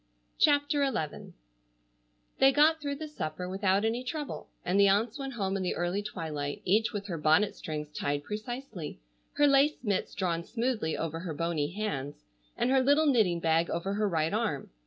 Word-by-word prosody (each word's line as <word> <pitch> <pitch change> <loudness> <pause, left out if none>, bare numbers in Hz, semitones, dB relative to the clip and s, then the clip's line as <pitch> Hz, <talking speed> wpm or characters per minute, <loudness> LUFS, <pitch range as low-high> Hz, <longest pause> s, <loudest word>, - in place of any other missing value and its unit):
CHAPTER 290 0 +3
XI 230 - -3 1.1
They 270 0 +7
got 310 +3 +4
through 285 -1 -2
the 310 +2 -6
supper 180 - -5
without 195 +2 +1
any 235 +3 0
trouble, 295 +3 -5 0.2
and 185 +3 +2
the 200 - +7
aunts 215 +6 +2
went 270 -1 -4
home 195 -4 -1
in 195 - -1
the 180 - -1
early 175 +3 -1
twilight, 155 -8 -4
each 215 +4 +3
with 205 -3 -4
her 170 -5 -4
bonnet 160 +7 +3
strings 150 -1 -5
tied 145 0 -2
precisely, 215 - -6 0.3
her 290 - +4
lace 280 +1 +4
mitts 205 -5 -1
drawn 170 -3 -1
smoothly 230 -7 -1
over 165 0 -3
her 165 -3 -5
bony 165 -2 -1
hands, 155 - -4 0.3
and 250 - +1
her 265 -1 +5
little 285 +4 +4
knitting 215 - +3
bag 165 +1 +2
over 180 +4 -2
her 210 0 +1
right 160 0 0
arm. 210 - -1
200 Hz, 180 wpm, -29 LUFS, 165-255 Hz, 1.1 s, They